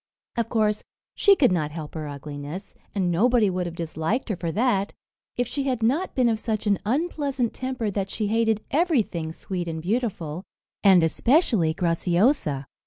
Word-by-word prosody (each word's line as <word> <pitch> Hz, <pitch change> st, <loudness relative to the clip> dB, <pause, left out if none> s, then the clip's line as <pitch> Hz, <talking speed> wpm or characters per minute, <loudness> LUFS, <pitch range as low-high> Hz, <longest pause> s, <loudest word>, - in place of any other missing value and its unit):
Of 230 Hz, -2 st, -1 dB
course 215 Hz, -2 st, +1 dB, 0.3 s
she 400 Hz, -1 st, +5 dB
could 260 Hz, -, +4 dB
not 155 Hz, -4 st, 0 dB
help 155 Hz, -1 st, -7 dB
her 155 Hz, -2 st, -5 dB
ugliness, 145 Hz, +5 st, -7 dB, 0.2 s
and 185 Hz, -3 st, +1 dB
nobody 220 Hz, +3 st, +3 dB
would 180 Hz, -1 st, -2 dB
have 170 Hz, -, -7 dB
disliked 165 Hz, +9 st, -2 dB
her 210 Hz, -, 0 dB
for 170 Hz, -2 st, -3 dB
that, 210 Hz, -1 st, +1 dB, 0.4 s
if 245 Hz, -1 st, +1 dB
she 280 Hz, +1 st, -3 dB
had 250 Hz, -4 st, -1 dB
not 290 Hz, +12 st, +1 dB
been 255 Hz, -2 st, +3 dB
of 225 Hz, -2 st, +1 dB
such 220 Hz, -1 st, -2 dB
an 200 Hz, -2 st, +2 dB
unpleasant 275 Hz, -1 st, -1 dB
temper 255 Hz, -5 st, -3 dB
that 195 Hz, 0 st, -2 dB
she 215 Hz, -, -2 dB
hated 220 Hz, 0 st, +1 dB
everything 250 Hz, -, +1 dB
sweet 175 Hz, +1 st, -5 dB
and 160 Hz, -1 st, -3 dB
beautiful, 180 Hz, -4 st, -2 dB, 0.4 s
and 190 Hz, -4 st, +7 dB
especially 195 Hz, -, +2 dB
Graciosa. 170 Hz, -, +1 dB
205 Hz, 170 wpm, -25 LUFS, 170-245 Hz, 0.4 s, and